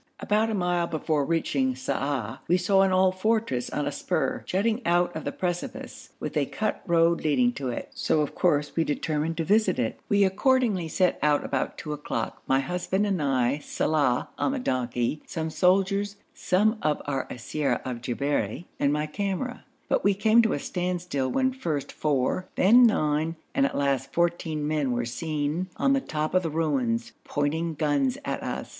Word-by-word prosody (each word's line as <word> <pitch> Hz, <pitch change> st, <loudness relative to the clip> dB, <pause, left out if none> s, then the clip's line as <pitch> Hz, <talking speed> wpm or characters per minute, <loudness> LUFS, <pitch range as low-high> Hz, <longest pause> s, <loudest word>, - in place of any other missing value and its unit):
About 215 Hz, +2 st, +1 dB
a 220 Hz, -, -1 dB
mile 175 Hz, -2 st, +1 dB
before 155 Hz, -2 st, 0 dB
reaching 140 Hz, -5 st, 0 dB
Sa'ah 130 Hz, -3 st, -2 dB
we 180 Hz, -, +4 dB
saw 195 Hz, +2 st, +3 dB
an 195 Hz, -1 st, +3 dB
old 185 Hz, 0 st, +3 dB
fortress 215 Hz, -, 0 dB
on -, -, -2 dB
a -, -, -1 dB
spur -, -, -1 dB
jutting 220 Hz, +5 st, 0 dB
out 175 Hz, -1 st, +2 dB
of -, -, -5 dB
the -, -, -1 dB
precipice, 175 Hz, -1 st, -5 dB
with -, -, -5 dB
a -, -, +1 dB
cut -, -, -2 dB
road 170 Hz, 0 st, +3 dB
leading 245 Hz, +11 st, +3 dB
to 135 Hz, -, -4 dB
it, 120 Hz, -, -5 dB
so 155 Hz, -, +1 dB
of 150 Hz, -, -2 dB
course 150 Hz, -5 st, +1 dB
we 165 Hz, -, +2 dB
determined 155 Hz, +1 st, -1 dB
to 165 Hz, -, 0 dB
visit 205 Hz, -1 st, +3 dB
it. 120 Hz, -3 st, -2 dB
We 200 Hz, 0 st, +4 dB
accordingly 205 Hz, -2 st, +2 dB
set 180 Hz, +2 st, +1 dB
out 150 Hz, 0 st, +2 dB
about 130 Hz, -, -2 dB
two 150 Hz, -, -5 dB
o'clock, 150 Hz, 0 st, -4 dB
my 135 Hz, 0 st, +3 dB
husband 180 Hz, +6 st, -1 dB
and 195 Hz, -5 st, 0 dB
I, 135 Hz, -1 st, +1 dB
Saleh 145 Hz, -4 st, +1 dB
on -, -, +1 dB
the -, -, -1 dB
donkey, 125 Hz, -, -1 dB
some 160 Hz, -1 st, -3 dB
soldiers, 195 Hz, +3 st, +2 dB, 0.2 s
some 215 Hz, +4 st, +1 dB
of 150 Hz, -1 st, +1 dB
our 135 Hz, -2 st, -2 dB
siyara 140 Hz, +4 st, -2 dB
of 125 Hz, -2 st, -4 dB
Jabberi, 125 Hz, -, -2 dB
and 140 Hz, -, +2 dB
my 150 Hz, +1 st, 0 dB
camera. 200 Hz, +9 st, -3 dB, 0.2 s
But -, -, +1 dB
we 200 Hz, 0 st, +3 dB
came 220 Hz, +3 st, +5 dB
to 225 Hz, -, +1 dB
a -, -, 0 dB
standstill 175 Hz, -6 st, -2 dB
when 260 Hz, -, +1 dB
first 160 Hz, -, -3 dB
four, 150 Hz, +4 st, 0 dB
then 240 Hz, +6 st, +7 dB
nine, 155 Hz, -4 st, 0 dB, 0.2 s
and 275 Hz, 0 st, +3 dB
at -, -, -5 dB
last 135 Hz, -1 st, 0 dB
fourteen 165 Hz, -3 st, 0 dB
men 150 Hz, -4 st, 0 dB
were 120 Hz, 0 st, -1 dB
seen 155 Hz, +6 st, -2 dB
on 275 Hz, -, +3 dB
the 275 Hz, -, +2 dB
top 155 Hz, -8 st, -3 dB
of 185 Hz, -, +4 dB
the 165 Hz, -, -2 dB
ruins, 135 Hz, -8 st, 0 dB
pointing 160 Hz, +3 st, -1 dB
guns 145 Hz, -4 st, +1 dB
at -, -, -2 dB
us. -, -, -4 dB
160 Hz, 185 wpm, -26 LUFS, 145-190 Hz, 0.2 s, then